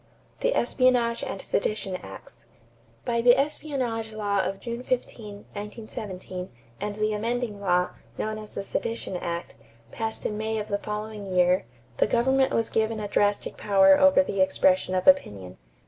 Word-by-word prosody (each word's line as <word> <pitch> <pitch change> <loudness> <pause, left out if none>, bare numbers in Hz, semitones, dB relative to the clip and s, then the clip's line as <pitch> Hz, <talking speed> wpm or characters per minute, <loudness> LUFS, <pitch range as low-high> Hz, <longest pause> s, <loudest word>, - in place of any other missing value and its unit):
=The - - +1
Espionage 240 -1 +2
and 195 - -4
Sedition 200 -2 -1
Acts.= - - -12 0.6
By 235 -1 +1
the 245 +2 +6
Espionage 260 -6 -2
law 205 -2 0
of 195 0 -1
June 235 0 -5
15, 225 -5 -4
1917, 205 -3 -7 0.3
and 205 0 -3
the 215 0 0
amending 230 0 -2
law, 180 -2 +2 0.3
known 215 0 -3
as 215 -1 -9
the - - -3
Sedition 225 0 -3
act, 170 -1 -4 0.4
passed 225 0 -4
in 210 0 -2
May 220 0 -1
of 210 0 -4
the 200 -1 0
following 210 -1 -5
year, 180 0 +3 0.3
the - - +3
government 265 +3 +2
was 225 -1 0
given 220 0 0
a 210 - -3
drastic 205 0 0
power 200 +5 +5
over 280 0 +6
the 195 -8 -1
expression 190 0 +3
of 185 - 0
opinion. 100 - +3
215 Hz, 155 wpm, -26 LUFS, 195-235 Hz, 0.6 s, the